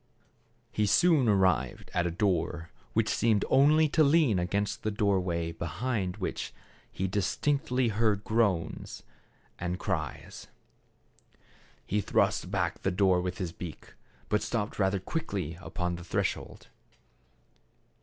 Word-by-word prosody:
He 105 -1 +1
soon 135 - +4
arrived 95 - +1
at 90 -1 +1
a - - 0
door, 85 -2 -1 0.2
which - - +2
seemed 110 -2 +2
only 155 +3 +5
to 155 +2 +4
lean 140 - +4
against 100 +3 -1
the 110 - -1
door 100 -2 +2
way 85 -2 -2
behind 95 +3 -3
which 95 - -4 0.4
he 95 - -2
distinctly 125 - 0
heard 105 -1 +1
groans 105 -8 -1 0.6
and 90 0 -2
98 - - -3
THE - - -12
CARAVAN. 80 -7 -2
cries. - - -11 1.4
He 105 +1 0
thrust - - +1
back - - -1
the - - +1
door 95 -1 +3
with 90 +1 -3
his 90 -3 -3
beak, 85 -1 -9 0.3
but 105 - +1
stopped 105 -3 -3
rather 95 0 +2
quickly 95 - -3
upon 90 -3 -3
the 85 - -9
threshold. 85 - -3
100 Hz, 135 wpm, -29 LUFS, 90-110 Hz, 1.4 s, only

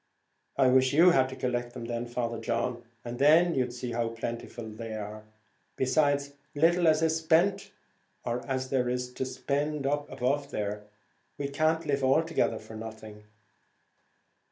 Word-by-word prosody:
"I 130 - +5
wish 130 +1 +4
you 170 +5 +7
had 130 -5 +3
to 130 - -7
collect 120 -1 -2
them 115 - -6
then, 120 0 -3
Father 120 -1 -3
John, 115 +1 -2 0.2
and 120 0 -6
then 160 +5 +5
you'd 125 -3 0
see 125 0 -5
how 115 0 0
plentiful 115 0 -6
they 110 +1 -6
are; 105 0 -6 0.5
besides, 140 +1 +1 0.2
little 170 +3 +4
as 155 0 +4
is 160 0 +2
spent, 165 +4 +2 0.5
or 120 +1 -2
as 130 -1 -2
there 125 -2 +1
is 125 0 -3
to 130 - -3
spend 145 +2 -2
up 145 +1 -1
above 140 +2 -1
there, 105 -4 -3 0.6
we 140 -1 -3
can't 155 +3 +1
live 140 -2 0
altogether 155 -3 +2
for 110 0 -11
nothing." 110 -1 -9
130 Hz, 155 wpm, -29 LUFS, 115-145 Hz, 0.6 s, you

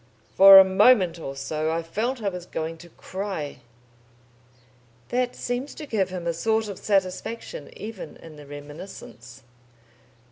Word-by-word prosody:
For 195 0 +10
a 195 - +11
moment 190 -2 +4
or 135 -4 -6
so 155 +3 -2
I 165 +1 -2
felt 225 +8 -3
I 200 - +1
was 180 -2 -8
going 160 +1 -4
to 175 - -13
cry...." 185 -4 -6 1.5
That 250 0 -1
seems 245 +3 -4
to 310 - -7
give 205 -8 0
him 180 -2 -6
a 170 - 0
sort 220 +5 0
of 195 - -7
satisfaction 205 - -2
even 210 -7 -8
in 160 -2 -13
the 145 -1 -13
reminiscence. 145 -4 -11
185 Hz, 145 wpm, -25 LUFS, 160-220 Hz, 1.5 s, a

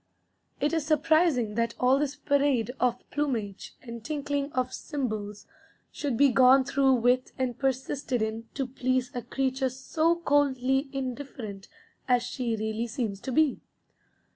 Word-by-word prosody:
It 295 +3 +1
is 320 -2 +1
surprising 310 -7 +3
that 230 +1 -1
all 255 +2 +4
this 290 -1 -1
parade 280 -5 +1
of 245 -1 0
plumage 230 -9 -3
and 235 -2 -8
tinkling 285 0 -2
of 255 0 -1
cymbals 215 -8 -4 0.5
should 275 -6 -2
be 280 +2 +6
gone 260 +2 +6
through 270 0 +3
with 250 +1 +2
and 255 -2 -1
persisted 265 -1 -1
in 220 +1 -3
to 275 - -1
please 255 0 -1
a 245 - -3
creature 265 +1 -1
so 315 +6 0
coldly 275 -4 +1
indifferent 255 -7 -6 0.4
as 245 -2 +3
she 245 -2 -2
really 220 +2 -2
seems 220 -4 -3
to 260 - -5
be. 305 +1 +2
260 Hz, 140 wpm, -28 LUFS, 235-280 Hz, 0.5 s, be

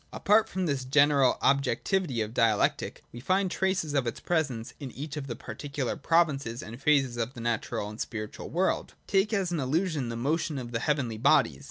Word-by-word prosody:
Apart 215 +2 +3
from 185 0 -2
this 140 -5 -1
general 140 0 +4
objectivity 140 - +1
of 110 +1 -3
Dialectic, 115 -4 +1
we 120 - -9
find 185 +7 +1
traces 190 -6 0
of 135 -4 +1
its 115 - -3
presence 140 -9 -1
in 140 -3 -6
each 145 +2 -6
of 145 -2 -5
the 120 - -4
particular 130 +4 -4
provinces 140 -8 +1
and 115 +5 -9
phases 135 -4 +2
of 115 +2 -3
the - - -8
natural 115 -3 -2
and 105 +2 -9
the - - -2
spiritual 105 -2 -5
world. 185 +3 -1
Take 195 +2 +2
as 195 -5 0
an 170 - -1
illustration 150 -1 0
the 115 - -4
motion 150 +5 -1
of 120 -2 -6
the 115 - -1
heavenly 125 -5 -1
bodies. 85 - +3
140 Hz, 195 wpm, -28 LUFS, 120-165 Hz, -, general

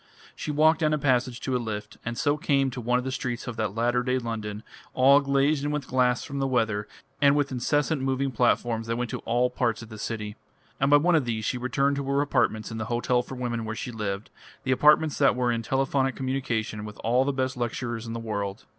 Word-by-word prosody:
She - - -5
walked 155 +2 +4
down 155 -2 +2
a - - -1
passage 130 -3 +1
to 130 - -1
a 125 - 0
lift, 105 -2 -5
and 115 0 -4
so 145 -1 +2
came 140 -4 +1
to 125 - -6
one 125 +2 +2
of 125 - -3
the 130 - -2
streets 125 -2 -3
of 120 - -5
that 110 -2 -2
latter 120 +2 +1
day 125 +1 0
London, 110 -3 -4 0.3
all 135 +2 +6
glazed 140 +1 +1
in 145 - 0
with 150 -2 -2
glass 125 -1 +1
from 140 0 -5
the 135 - +1
weather, 110 -5 0 0.3
and 140 0 +6
with 145 -2 +1
incessant 145 +4 0
moving 135 0 0
platforms 120 -1 +1
that 115 - -1
went 120 -1 -2
to - - -3
all 125 +2 +1
parts 120 -3 -1
of 110 - -12
the 110 -1 -9
city. 105 -1 -4 0.4
And 135 - +2
by 145 - +8
one 175 +4 +3
of 155 -5 +3
these 110 -2 -2
she 125 - -1
returned 140 +3 +1
to 140 - -2
her 140 +1 +1
apartments 110 -7 0
in 110 - -5
the 110 - -2
Hotel 120 +1 +1
for 130 - -8
Women 120 -2 -3
where 110 0 -4
she 125 - -5
lived, 105 -2 -4 0.3
the 130 - -1
apartments 150 +3 +4
that 140 -3 +4
were 125 -1 +1
in 115 -1 -1
telephonic 135 +2 0
communication 120 -5 -2
with 105 0 -8
all 125 +3 +3
the 140 - 0
best 130 -1 -1
lecturers 120 -1 -3
in 115 - -4
the 115 - -4
world. 100 -2 -4
125 Hz, 240 wpm, -26 LUFS, 115-135 Hz, 0.4 s, by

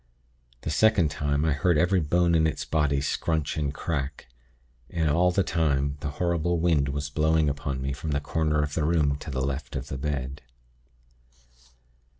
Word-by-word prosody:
The - - -3
second 95 -3 +3
time, 75 +1 0
I 80 - +2
heard 75 +4 +2
every 90 +4 +3
bone 85 +2 +2
in 80 -1 +4
its 80 - -3
body 75 -3 +1
scrunch 80 +1 -1
and 75 -2 -1
crack. 70 -2 -4 0.6
And 80 -4 0
all 90 +4 +3
the 95 +2 +2
time 70 -4 0
the 75 - -3
horrible 85 0 +1
wind 80 -5 +2
was 70 +1 -3
blowing 80 +1 +2
upon 70 -2 -2
me 70 0 -2
from 75 +3 -5
the 70 -1 +1
corner 75 0 0
of 75 0 -4
the 80 - 0
room 75 -3 +2
to - - -8
the 65 -2 -2
left 70 +1 -4
of 65 +1 -5
the 65 - -4
bed. 70 -2 -3
75 Hz, 175 wpm, -26 LUFS, 70-80 Hz, 0.6 s, in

